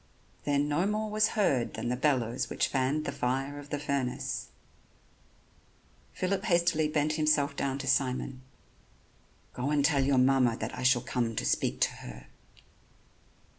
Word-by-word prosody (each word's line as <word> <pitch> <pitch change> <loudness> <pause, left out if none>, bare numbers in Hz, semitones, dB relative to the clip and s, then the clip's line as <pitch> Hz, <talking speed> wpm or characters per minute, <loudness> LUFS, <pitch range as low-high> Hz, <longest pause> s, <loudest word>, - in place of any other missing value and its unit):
Then 145 0 +1
no 150 +6 +1
more 215 +1 -2
was 215 +1 +1
heard 135 - +1
than 120 - -3
the 125 - 0
bellows 130 -2 0
which - - 0
fanned 135 +3 0
the - - -2
fire 135 +3 -2
of 145 0 -11
the 145 - -2
furnace. 140 -3 -2 1.6
Phillip 190 +2 -2
hastily 170 -5 +2
bent 150 0 0
himself 155 -2 +2
down 135 -1 -1
to 140 - -6
Simon: 130 0 0 1.1
"Go 125 +3 -2
and 145 -1 +2
tell 145 -3 +3
your 135 0 +2
mamma 125 -2 +3
that - - -5
I - - -6
shall 125 -1 +3
come 115 -3 -2
to - - -2
speak - - 0
to - - +3
her." - - -10
140 Hz, 155 wpm, -29 LUFS, 130-155 Hz, 1.6 s, tell